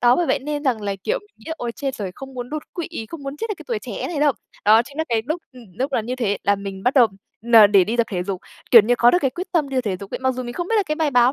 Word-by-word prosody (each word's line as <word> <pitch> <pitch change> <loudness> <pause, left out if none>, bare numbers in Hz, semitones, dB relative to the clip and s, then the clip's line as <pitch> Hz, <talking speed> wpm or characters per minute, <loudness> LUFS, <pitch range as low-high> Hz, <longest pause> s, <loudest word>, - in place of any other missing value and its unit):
Đó, 245 0 +5
bởi 350 - +1
vậy - - +2
nên 290 +2 -4
rằng 240 -5 +1
là, 200 -1 -2
kiểu, - - 0
mình 415 - -21
nghĩ 220 - -20
là 320 - -2
"ôi, 240 -1 -3
chết 270 +1 -4
rồi, 200 -3 -4
không 270 -1 -10
muốn 245 -1 -6
đột 305 0 -3
quỵ, 345 -3 -4 0.2
không 330 -4 -8
muốn 275 +1 -5
chết 450 +5 -4
ở - - -1
cái - - -11
tuổi 460 -3 -1
trẻ - - -8
thế - - -2
này 310 -4 -3
đâu". 295 -1 +4 0.3
Đó 220 +2 +6
chính 280 +5 -13
là 320 - +1
cái 225 -1 +1
lúc, 320 +4 -2
ừm, 250 -2 -13
lúc 270 +2 -1
là - - +2
như 250 +3 -4
thế 205 -5 0
là 200 - +4
mình 195 -1 -7
bắt 250 +4 +1
đầu 250 -4 +7 0.4
là 230 -3 +8
n 205 - -8
để 195 -3 +6
đi 230 +5 -2
tập 235 - +2
thể 180 -3 -1
dục, 185 -1 -4 0.3
kiểu 230 -3 +10
như, 240 +4 +2
có 240 - +6
được 355 - +3
cái 270 - +1
quyết 365 +4 -7
tâm 305 -5 +1
đi 265 -1 0
thể 200 -6 -2
dục 200 - -9
ấy. - - -2
Mặc 260 0 +1
dù 255 - -4
mình 240 0 -6
không 350 +5 -4
biết 455 - +2
là 420 - +4
cái 305 - 0
bài 310 -2 0
báo 245 0 +4
255 Hz, 360 wpm, -22 LUFS, 225-300 Hz, 0.4 s, kiểu